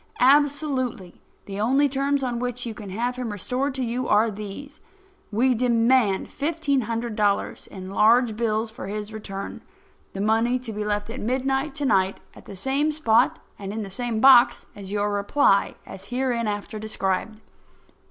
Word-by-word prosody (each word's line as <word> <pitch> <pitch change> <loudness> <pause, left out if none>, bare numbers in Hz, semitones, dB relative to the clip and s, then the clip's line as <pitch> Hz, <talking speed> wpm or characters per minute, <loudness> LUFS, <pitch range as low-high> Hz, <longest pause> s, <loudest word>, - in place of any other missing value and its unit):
Absolutely, 270 - +1 0.2
the 200 0 -6
only 270 +7 +3
terms 275 +1 0
on 240 -2 -2
which 245 0 -3
you 230 - -4
can 210 -2 -9
have 240 +6 -2
him 245 -3 -3
restored 255 +7 -2
to 265 - -2
you 245 +2 -2
are 215 +2 +3
these: 215 +9 -8 0.5
We 250 +5 +3
demand 235 -3 +2
fifteen 290 -2 0
hundred 230 0 -3
dollars 205 -2 0
in 185 -1 -9
large 225 +3 +4
bills 220 0 -1
for 230 -1 -8
his 210 +1 -5
return; 195 -2 -6 0.5
the 195 - -6
money 225 +4 +2
to 245 -3 -7
be 210 0 -3
left 210 +1 -2
at 255 - -6
midnight 270 +4 -1
to 290 -1 -2
night 190 -6 +2
at - - -15
the 195 - -9
same 275 +9 +2
spot 245 -6 +2 0.2
and 195 -1 -5
in 220 +1 -4
the 195 - -8
same 235 +2 -2
box 260 -1 +6
as 195 -1 -9
your 205 0 0
reply—as 200 -3 +1
hereinafter 235 -4 -2
described. 215 0 -2
230 Hz, 160 wpm, -24 LUFS, 210-260 Hz, 0.5 s, box